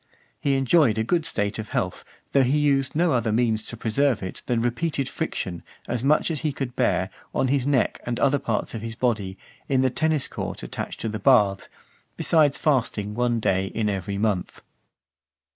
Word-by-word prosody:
He 140 -1 +1
enjoyed 135 -3 +3
a 110 - +1
good 165 +6 0
state 100 -8 -2
of 110 - -5
health, - - -2 0.3
though 140 - +4
he 135 +3 +2
used 140 -2 +1
no 165 0 +3
other 115 -3 +1
means 110 -1 +1
to 120 - -7
preserve 120 +1 +1
it, 95 - -6
than 120 -2 +1
repeated 135 +4 -1
friction, 85 -2 -4 0.3
as 120 0 -2
much 150 +5 +3
(459) - - 0
as 155 - -3
he 155 - 0
could 130 -3 -4
bear, 95 -6 +1 0.3
on 130 - +1
his 140 -1 +1
neck 140 -3 +1
and 120 0 -3
other 140 0 +3
parts 115 -5 -2
of 115 - -5
his 115 0 -5
body, 105 -6 -1 0.3
in 135 -2 +3
the 130 -1 +2
tennis 155 +1 +1
court - - -5
attached - - -5
to - - -2
the 110 0 -3
baths, 105 -8 +3 0.5
besides 150 -4 +3
fasting 115 -8 0
one 120 0 +1
day 95 -2 +1
in 105 +1 -1
every 100 0 -3
month. 100 -3 -1
120 Hz, 195 wpm, -24 LUFS, 110-140 Hz, 0.5 s, though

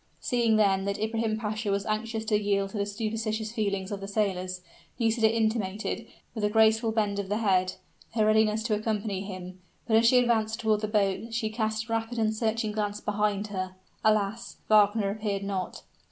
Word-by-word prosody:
Seeing, 235 -4 +2
then, 195 -3 +3
that 200 0 -1
Ibrahim 220 0 -1
Pasha 215 0 -3
was 200 0 0
anxious 220 +1 -2
to 215 - +2
yield 200 -1 0
to 215 - -5
the 200 - 0
superstitious 220 +1 -2
feelings 200 -4 -2
of 200 -1 -4
the 195 - -5
sailors, 185 -3 -1 0.4
Nisida 225 -1 +3
intimated, 220 -1 -1 0.3
with 220 - -4
a 210 - +3
graceful 220 +1 +4
bend 210 -2 0
of 195 -1 -4
the 205 - +1
head, 185 -4 +2 0.4
her 215 -2 +3
readiness 215 0 +3
to 225 -1 0
accompany 210 -2 -1
him. 185 -2 -7 0.3
But, 220 -2 +3
as 230 +1 +5
she 250 - +6
advanced 225 -3 +2
toward 215 -2 +1
the 215 - -1
boat, 210 +2 0
she 220 -2 -1
cast 220 0 -2
a 230 - -3
rapid 225 +1 -2
and 220 -1 +2
searching 220 0 -1
glance 210 -1 -2
behind 210 0 -1
her. 185 -2 -4 0.3
Alas! 215 +2 +1
Wagner 205 -1 +4
appeared 205 -1 -2
not. 195 -2 -4
215 Hz, 185 wpm, -28 LUFS, 200-220 Hz, 0.4 s, she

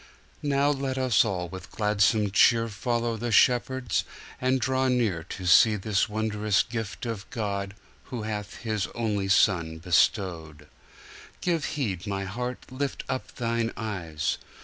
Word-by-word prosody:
Now 140 0 +2
let 135 -2 -2
us 130 -3 +4
all 95 -5 -2
with 95 +2 -9
gladsome 105 -1 +2
cheerFollow 115 +1 +2
the 120 +1 -2
shepherds, 125 0 +3 0.4
and 130 +1 +2
draw 130 +2 +1
nearTo 100 -7 -1
see 105 +4 +6
this 105 +2 0
wondrous 105 -1 +1
gift 110 -1 -5
of 115 -4 -5
GodWho 105 +1 -5
hath 105 -2 -4
His 110 -3 -1
only 105 -4 -1
Son 90 -4 +3
bestowed. 85 -3 0 0.7
Give 170 -4 0
heed, 105 - -3
my 100 -1 -2
heart, 125 +6 -5
lift 140 +2 -3
up 130 - -4
thine 115 -1 -1
eyes! 85 -9 -3
110 Hz, 125 wpm, -27 LUFS, 95-125 Hz, 0.7 s, see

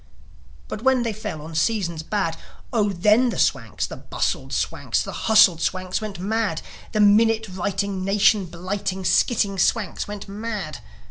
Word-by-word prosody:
But 210 - -6
when 260 -1 +3
they 230 -2 -1
fell 205 -8 -6
on 160 +1 -9
seasons 170 -1 0
bad, 165 -1 -1 0.4
Oh, 210 -3 +2
then 210 +7 +3
the - - -4
Swanks, - - 0
the - - -8
bustled - - -3
Swanks, - - -1
The - - -6
hustled 210 -7 +5
Swanks 185 +3 -1
went 215 -3 -5
mad 205 -2 -1 0.3
The 215 - -1
minute 220 +2 +4
writing, 195 +1 -2
nation 200 0 +3
blighting, 185 +2 -4
Skiting 200 -5 +2
Swanks 215 +3 0
went 205 0 -7
mad. 200 -6 -5
200 Hz, 150 wpm, -23 LUFS, 185-220 Hz, 0.4 s, hustled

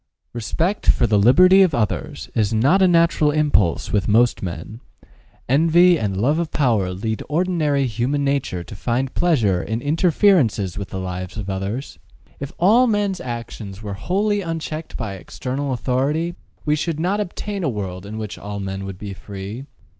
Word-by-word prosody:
Respect 165 - -2
for - - +4
the 105 -2 +3
liberty 185 - +6
of 180 -6 +3
others 145 +6 -2
is 110 -4 +1
not 135 - +3
a 190 - +6
natural 170 -3 +3
impulse 145 - +1
with 105 -2 +1
most 120 +3 +3
men: 90 +5 -6 0.7
envy 165 +5 +5
and 100 -3 -2
love 145 +9 +2
of 170 -2 -2
power 110 -10 +1
lead 110 +4 -3
ordinary 155 -4 +1
human 125 +5 -1
nature 135 -11 -1
to 105 - -10
find 125 +6 -2
pleasure 115 - +2
in 110 +8 -3
interferences 145 - +2
with 100 -1 -5
the 95 - -5
lives 90 +1 -5
of 100 -2 -4
others. 100 +8 -4 0.4
If 140 0 -6
all 225 +8 +5
men's 205 -4 0
actions 115 -4 -7
were 100 -1 -4
wholly 200 - 0
unchecked 165 -2 -5
by 105 -5 -4
external 130 - -4
authority, 135 +7 -1 0.3
we 150 -1 +2
should 155 0 -2
not 185 +5 0
obtain 205 0 -4
a 155 - +1
world 95 -5 -5
in 110 +1 -6
which 110 -2 -6
all 100 0 -6
men 95 0 -4
would 95 -1 -7
be 100 0 -7
free. 100 +7 -8
130 Hz, 170 wpm, -21 LUFS, 100-165 Hz, 0.7 s, liberty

